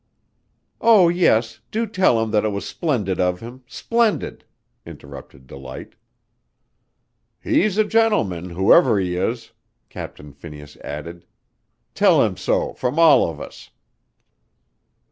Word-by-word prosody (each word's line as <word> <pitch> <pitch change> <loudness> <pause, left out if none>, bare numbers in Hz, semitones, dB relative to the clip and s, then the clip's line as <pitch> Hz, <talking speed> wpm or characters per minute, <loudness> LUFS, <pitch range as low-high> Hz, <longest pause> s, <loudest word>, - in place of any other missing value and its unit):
"Oh, 215 -7 +5
yes, 115 -10 +1
do 225 +2 -2
tell 185 - +2
him 110 - -4
that 105 - +1
it 110 - 0
was 100 -1 -5
splendid 110 - -2
of 90 0 0
him, 120 +3 -11
splendid!" 230 - -1 0.4
interrupted 65 0 -13
Delight. 65 0 -10 1.5
"He's 205 -1 0
a 215 - +4
gentleman, 210 - 0
whoever 95 - +4
he 90 -2 -2
is," 115 +6 -3 0.4
Captain 75 -1 -10
Phineas 75 0 -12
added. 85 +4 -9 0.7
"Tell - - +4
him - - -3
so - - -1
from 125 +4 -3
all 155 - +5
of 80 -2 -9
us." - - -11
110 Hz, 120 wpm, -21 LUFS, -, 1.5 s, Oh